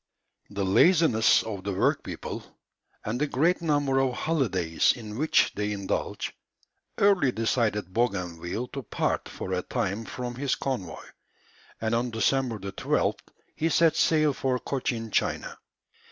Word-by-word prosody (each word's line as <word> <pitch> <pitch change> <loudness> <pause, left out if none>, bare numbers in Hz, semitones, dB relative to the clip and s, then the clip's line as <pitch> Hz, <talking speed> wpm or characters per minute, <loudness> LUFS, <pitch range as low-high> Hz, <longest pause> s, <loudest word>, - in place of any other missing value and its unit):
The 100 -1 -2
laziness 150 - +5
of 100 -4 -6
the 100 0 -2
workpeople, - - -1 0.6
and 115 +5 -2
the 150 - +2
great 165 +7 +2
number 145 -4 +1
of 135 -1 +1
holidays 100 - +1
in 110 -3 -8
which 155 +6 +3
they 105 +1 -2
indulge, 100 -2 -3 0.6
early 195 -10 +4
decided 110 -5 0
Bougainville 95 -1 -2
to 140 - -5
part - - -2
for 95 - -5
a 90 - 0
time 110 0 -2
from 125 +1 -5
his 135 +2 -1
convoy, 120 -11 -4 0.7
and 110 0 -1
on 120 +2 +1
December 120 +1 +1
12th 100 -1 -1 0.4
he 165 - 0
set 165 0 +4
sail 155 -2 +3
for 130 -1 0
Cochin 120 -4 -3
China. - - -1
120 Hz, 135 wpm, -27 LUFS, 105-140 Hz, 0.7 s, laziness